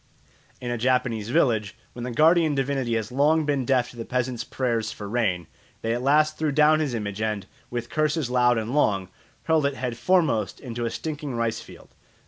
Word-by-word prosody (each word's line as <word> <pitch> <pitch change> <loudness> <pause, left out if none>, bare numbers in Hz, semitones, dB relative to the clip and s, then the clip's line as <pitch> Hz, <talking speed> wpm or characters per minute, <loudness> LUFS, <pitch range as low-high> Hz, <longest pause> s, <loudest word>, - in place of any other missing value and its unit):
In 120 -1 -4
a 120 - -2
Japanese 120 -3 0
village, 115 -7 +1 0.2
when 120 - -8
the 125 - -3
guardian 155 +4 +4
divinity 135 -3 0
had 110 -1 -2
long 150 +4 +3
been 140 -3 0
deaf 125 -2 +1
to 120 - -15
the 115 - -4
peasants' 125 -1 -2
prayers 115 -3 -1
for 105 - -7
rain, 100 -6 0 0.4
they 115 0 0
at 120 - -2
last 150 +3 +3
threw 155 -2 +1
down 150 +2 +4
his 145 -6 -1
image 105 -2 -4
and, 105 -2 -2 0.2
with 120 -1 -5
curses 155 -2 0
loud 125 -1 +3
and 115 +2 -3
long, 100 -10 +1 0.3
hurled 160 -3 +2
it 140 - -3
head 125 -3 -4
foremost 145 - +1
into 120 -2 -4
a - - 0
stinking 150 -1 -5
rice 115 -1 -1
field. - - -15
125 Hz, 195 wpm, -25 LUFS, 115-145 Hz, 0.4 s, guardian